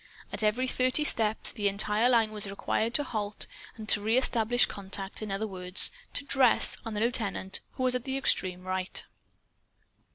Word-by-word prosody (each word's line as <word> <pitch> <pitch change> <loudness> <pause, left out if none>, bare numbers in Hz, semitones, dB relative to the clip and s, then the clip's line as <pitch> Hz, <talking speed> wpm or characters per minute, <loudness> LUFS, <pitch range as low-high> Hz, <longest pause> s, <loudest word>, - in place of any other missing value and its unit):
At - - -2
every 220 +5 +1
thirty 255 +4 +1
steps 220 -6 +2
the 205 -1 -1
entire 210 +4 +1
line 230 -3 +3
was 210 -2 -1
required 220 +3 -2
to 290 - +3
halt 210 -5 -3 0.3
and 220 -1 -9
to 205 - +3
reestablish 235 +1 +2
contact 195 0 -6
in 215 -2 -5
other 195 +3 -2
words, 185 -2 +3 0.2
to - - -2
"dress" 265 -4 +4
on 225 -1 -6
the - - -2
lieutenant, 205 -5 -1
who 255 - -4
was 255 -1 +2
at 250 -1 -2
the 265 0 -2
extreme 185 -8 0
right. 185 0 -2
215 Hz, 170 wpm, -28 LUFS, 200-245 Hz, 0.3 s, dress